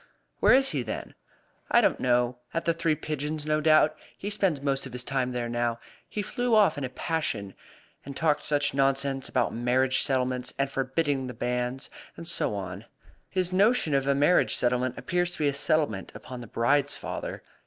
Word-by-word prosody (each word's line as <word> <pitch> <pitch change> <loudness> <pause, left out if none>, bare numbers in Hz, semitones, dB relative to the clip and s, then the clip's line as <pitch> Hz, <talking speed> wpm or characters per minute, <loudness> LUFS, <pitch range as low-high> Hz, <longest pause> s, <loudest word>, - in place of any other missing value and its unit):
"Where - - +6
is 270 0 +3
he, 140 - -1
then?" - - -5 0.6
"I - - +6
don't - - +2
know. 125 0 +1 0.2
At 165 - -1
the 170 - +3
Three 165 -1 +1
Pigeons, 150 0 -4
no 155 0 +1
doubt. 155 0 +5 0.2
He 205 - -4
spends 195 -7 +1
most 135 -1 -1
of - - -12
his 125 0 -2
time 130 -1 -1
there 120 -1 -2
now. 120 0 -1 0.3
He 210 - -3
flew 245 +2 0
off 205 -7 +5
in 145 - -4
a 130 - -2
passion, 130 - -2 0.5
and 140 0 -8
talked 155 -2 +1
such 145 -1 +1
nonsense 135 0 +1
about 125 -2 0
marriage 125 +2 +2
settlements, 130 -2 0
and 140 0 0
forbidding 135 0 -1
the 125 - -7
banns, 125 +2 -2 0.3
and 165 - -6
so 105 - +1
on. 95 +2 -6 0.4
His 185 -1 -1
notion 200 - +3
of 135 0 +1
a 140 - +3
marriage 150 +6 +3
settlement 125 +1 +1
appears 175 -1 -1
to - - -5
be 150 - +1
a 140 - +1
settlement 140 - 0
upon 125 +4 -8
the 120 - -9
bride's 135 +6 +1
father. - - -6
140 Hz, 190 wpm, -27 LUFS, 125-155 Hz, 0.6 s, Where